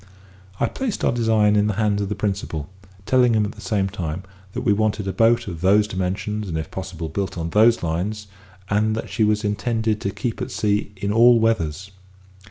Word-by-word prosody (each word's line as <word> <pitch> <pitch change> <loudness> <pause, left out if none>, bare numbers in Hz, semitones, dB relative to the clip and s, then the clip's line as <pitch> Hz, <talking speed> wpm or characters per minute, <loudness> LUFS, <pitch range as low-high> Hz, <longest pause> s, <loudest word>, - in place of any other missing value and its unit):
I - - +3
placed 260 -6 -3
our - - +3
design 110 -3 +3
in 105 0 +3
the 105 - -1
hands 105 -1 +1
of 100 - -2
the 105 - -2
principal, 95 -7 -3 0.4
telling 125 -1 +4
him 105 -1 +2
at 105 - -4
the 105 - -13
same 100 -4 0
time 90 -2 -4 0.3
that 125 - -3
we 110 -5 +3
wanted 105 -1 0
a 95 - -2
boat 115 +1 +3
of 85 -4 -6
those 100 +3 +4
dimensions, 100 +2 -3
and, 80 - -2
if 80 - -5
possible, 90 -4 -5
built 95 +4 -3
on 85 0 -3
those 115 +1 +4
lines, 95 +6 -2 0.4
and 105 +2 +1
that 110 - -5
she 110 - +1
was 105 0 +2
intended 110 +1 -1
to 100 - -1
keep 110 +4 -4
at - - -3
sea 105 -1 0
in 100 +1 -2
all 120 +1 +6
weathers. 95 -5 0
105 Hz, 205 wpm, -22 LUFS, 95-110 Hz, 0.4 s, all